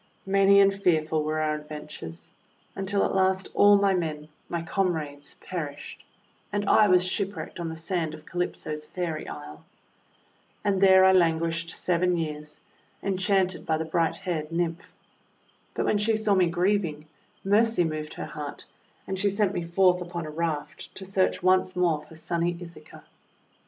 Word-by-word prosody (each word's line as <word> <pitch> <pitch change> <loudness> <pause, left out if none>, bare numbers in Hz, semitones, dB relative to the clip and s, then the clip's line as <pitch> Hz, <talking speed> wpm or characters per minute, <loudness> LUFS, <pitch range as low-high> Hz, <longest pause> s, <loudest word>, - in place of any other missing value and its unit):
Many 195 0 +5
and 195 0 +5
fearful 160 -5 +1
were 155 +1 -1
our 155 -1 +1
adventures, 150 - -8 0.4
until 195 +1 0
at - - -1
last 190 0 +1
all 205 0 +6
my 200 -1 +3
men 155 -4 -3
— - - -38
my 170 -1 -2
comrades 160 -6 -2
— - - -34
perished, 150 -5 -6 0.5
and 205 -1 -2
I 215 - +6
was 180 -1 +4
shipwrecked 195 0 -3
on 170 -1 -3
the 160 - -6
sand 160 -1 -2
of 155 - -15
Calypso's 155 -3 -3
Fairy 165 -1 -4
Isle. 75 +1 -9 1.0
And 200 -2 +1
there 190 -1 +7
I 190 - +7
languished 165 -2 +2
seven 180 +1 +1
years, 150 -2 -5 0.4
enchanted 190 -1 +1
by 160 - 0
the 160 - -3
bright 165 +1 0
haired 165 -5 -4
Nymph. 170 +1 -2 0.8
But - - -1
when 205 - +2
she 220 +2 +2
saw 215 -1 +2
me 185 -2 +4
grieving, 175 -3 0 0.4
mercy 210 0 +3
moved 155 -2 -4
her - - -5
heart, 150 -2 -7 0.4
and 190 -1 -3
she 200 +1 +2
sent 200 0 +1
me 175 - -2
forth 180 +1 +3
upon 175 -1 -5
a 155 - -6
raft 150 -2 -4
to 190 - -7
search 190 -1 0
once 185 0 +3
more 170 -4 +1
for 150 +2 -15
sunny 170 +1 -1
Ithaca. 165 -3 -12
175 Hz, 165 wpm, -26 LUFS, 155-190 Hz, 1.0 s, there